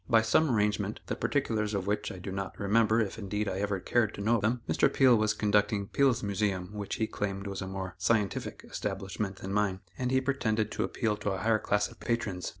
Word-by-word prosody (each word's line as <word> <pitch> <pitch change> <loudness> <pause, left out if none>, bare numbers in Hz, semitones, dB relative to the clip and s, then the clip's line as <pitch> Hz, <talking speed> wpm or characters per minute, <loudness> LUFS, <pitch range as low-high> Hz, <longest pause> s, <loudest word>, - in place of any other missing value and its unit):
By 115 -2 +5
some 140 +8 +3
arrangement, 105 -2 +1
the - - -2
particulars 110 -7 0
of 95 -2 -1
which 105 +1 -1
I - - -8
do 90 +2 -6
not 95 0 -5
remember, 110 +2 +3
if, 110 0 -1
indeed, 105 +1 -2
I 95 - -2
ever 100 -1 -1
cared 110 +3 +1
to - - -6
know 115 +3 +3
them, 115 +4 0
Mr. - - +3
Peale 130 -3 +6
was 110 0 +2
conducting 105 -1 +1
Peale's 130 -4 +2
Museum 100 -2 -1
which 105 -1 -4
he 110 - 0
claimed 100 -2 -3
was 100 -1 -4
a 95 - -4
more 95 -1 -5
"scientific" 100 0 0
establishment 95 0 -3
than 95 +1 -6
mine, 100 -2 +1 0.2
and 125 -1 0
he 130 0 +3
pretended 110 -5 0
to - - -1
appeal 110 -2 -1
to 105 0 -2
a 95 - -1
higher 110 +2 +2
class 105 0 +1
of - - -16
patrons. 110 -6 -2
105 Hz, 220 wpm, -30 LUFS, 100-110 Hz, 0.2 s, Peale